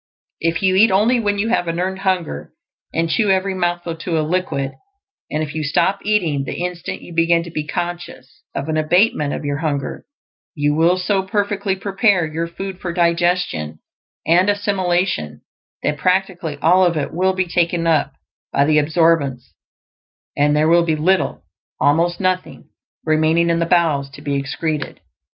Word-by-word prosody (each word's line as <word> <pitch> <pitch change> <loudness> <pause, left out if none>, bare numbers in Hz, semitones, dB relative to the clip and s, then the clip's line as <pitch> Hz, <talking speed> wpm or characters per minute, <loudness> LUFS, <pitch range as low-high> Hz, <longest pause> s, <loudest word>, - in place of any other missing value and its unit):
If 165 +2 -1
you 190 -1 +3
eat 215 +4 +6
only 215 +6 +3
when 205 -2 0
you 215 +3 0
have 200 -7 +1
an 165 +1 -2
EARNED 190 +1 -2
HUNGER, 175 - -2 0.4
and 165 +1 0
chew 210 +5 +1
every 190 0 +1
mouthful 175 -2 -2
to 165 0 -2
a 155 - 0
liquid, 150 -6 -1 0.6
and 155 +1 -1
if 145 - -6
you 155 - -3
stop 190 +6 +1
eating 175 -10 0
the 175 +6 -4
instant 180 -2 -5
you 175 - -11
BEGIN 165 0 +2
to 170 - -9
be 155 -1 -4
conscious 175 -6 -6
of 140 - -3
an 155 0 -1
abatement 155 -1 +2
of - - -6
your 145 0 -1
hunger, 145 -3 -3 0.5
you 145 -1 +1
will 165 +4 +3
so 190 +2 0
perfectly 200 0 -1
prepare 195 -2 +1
your 160 +2 -3
food 190 +2 -7
for 175 - -4
digestion 170 - 0 0.5
and 180 +4 +4
assimilation 185 - -1 0.4
that 150 -1 -1
practically 185 -4 0
all 180 +4 +5
of 170 -3 +2
it 145 - -3
will 185 +3 +1
be 185 0 0
taken 170 -1 0
up 160 -3 +2 0.4
by 140 - +2
the 155 0 +4
absorbents; 150 -4 +1 0.8
and 145 +1 +2
there 155 +1 +3
will 170 +1 +5
be 160 -2 0
little 180 +5 0 0.4
almost 170 +4 +2
nothing 185 -1 -2 0.4
remaining 160 +2 +2
in 165 - +1
the 170 - 0
bowels 160 -6 +2
to 140 +2 -13
be 145 -1 -2
excreted. 145 +3 -3
170 Hz, 170 wpm, -19 LUFS, 155-185 Hz, 0.8 s, eat